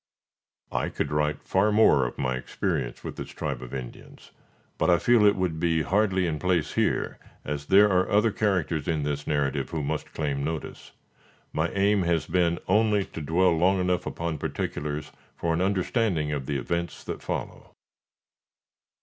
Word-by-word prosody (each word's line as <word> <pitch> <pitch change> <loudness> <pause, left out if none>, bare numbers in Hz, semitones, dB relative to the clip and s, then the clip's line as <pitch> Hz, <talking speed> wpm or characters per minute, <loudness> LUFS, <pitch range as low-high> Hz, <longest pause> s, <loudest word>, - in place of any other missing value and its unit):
I - - -1
could 70 - -3
write 75 0 0
far 100 +3 +2
more 75 - +5
of - - -8
my 65 0 -1
experience 65 - -3
with - - -6
this - - -6
tribe - - -4
of 65 - -8
Indians; 65 -3 -9 0.5
but - - +2
I 85 - +6
feel 120 +4 +4
it 100 - +4
would 90 -4 -1
be 80 -1 +1
hardly 95 +1 +2
in 80 -3 -2
place 90 -3 0
here, - - 0 0.3
as 70 0 -4
there 100 +2 +7
are 95 -2 +2
other 105 +2 +3
characters 90 -8 0
in 80 -3 0
this 75 0 -3
narrative 70 -2 0
who 80 -3 -3
must - - -3
claim 70 -3 -2
notice. 80 +1 -5 0.6
My 80 +2 0
aim 100 +1 +3
has 85 -2 +1
been 85 -1 +1
only 105 0 +3
to 80 - -8
dwell 85 +3 +3
long 95 +4 +3
enough 90 0 0
upon 85 -3 -3
particulars, 75 0 -3 0.2
for 85 -1 -1
an 85 - 0
understanding 95 -4 0
of 70 -3 -3
the 70 - -1
events 85 +6 -3
that - - -6
follow. - - -5
85 Hz, 170 wpm, -26 LUFS, 75-95 Hz, 0.6 s, there